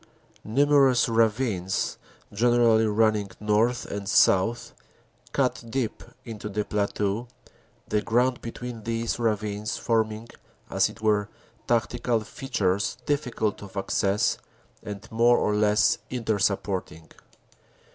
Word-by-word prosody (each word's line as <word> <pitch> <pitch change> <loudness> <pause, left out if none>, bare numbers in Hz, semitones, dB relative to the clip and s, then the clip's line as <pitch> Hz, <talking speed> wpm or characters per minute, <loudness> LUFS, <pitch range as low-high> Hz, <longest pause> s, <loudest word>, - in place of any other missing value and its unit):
Numerous 135 +1 +4
ravines, 110 -4 0 0.3
gen 120 +4 +2
erally 110 -2 +4
running 105 -1 +2
north 110 +3 +1
and 100 -1 -5
south, 110 +5 +3 0.6
cut 130 -2 0
deep 125 -2 -2 0.2
into 110 -3 -6
the 105 +1 -2
plateau, 105 +2 -1 0.6
the 105 - 0
ground 125 +3 +1
between 120 0 -7
these 115 +1 -2
ravines 105 -1 -1
forming, 110 -1 -1 0.4
as - - +2
it 115 - -13
were, 105 -1 +1 0.4
tactical 120 0 0
features 110 -7 -1
difficult 125 -7 -1
of 100 -1 -10
access 100 +1 +1 0.4
and 105 -2 -8
more 120 +2 +4
or 105 - +1
less 105 0 +3
inter 115 -4 -1
supporting. 95 -5 -2
110 Hz, 110 wpm, -26 LUFS, 105-120 Hz, 0.6 s, Numerous